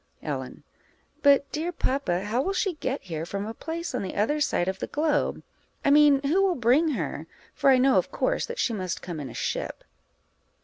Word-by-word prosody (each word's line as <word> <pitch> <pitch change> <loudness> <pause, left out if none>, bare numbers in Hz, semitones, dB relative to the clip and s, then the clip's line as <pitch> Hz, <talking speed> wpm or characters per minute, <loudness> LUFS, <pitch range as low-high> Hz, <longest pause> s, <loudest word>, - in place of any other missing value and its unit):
Ellen. - - -5 0.6
But, 280 0 +4
dear 320 +3 -2
papa, 260 - -1
how 230 +5 0
will 385 +8 -1
she 385 -1 0
get 285 -3 -3
here 160 -4 -4
from 200 +4 -4
a 220 - -5
place 330 +5 -5
on 250 - -1
the 190 - -5
other 295 +9 +1
side 175 -10 +1
of 190 0 -2
the - - -3
globe? 300 -1 0 0.4
I 280 - +5
mean, 290 -1 +6
who 320 +8 +2
will 385 -2 +2
bring 255 +6 +3
her? - - -4 0.3
for - - +2
I 265 - +6
know, 260 +1 +4
of - - -4
course, - - 0
that 475 - -6
she 235 - 0
must 185 -4 -4
come 175 -3 -5
in 140 -3 -6
a - - -10
ship. - - -3
275 Hz, 210 wpm, -26 LUFS, 205-310 Hz, 0.6 s, mean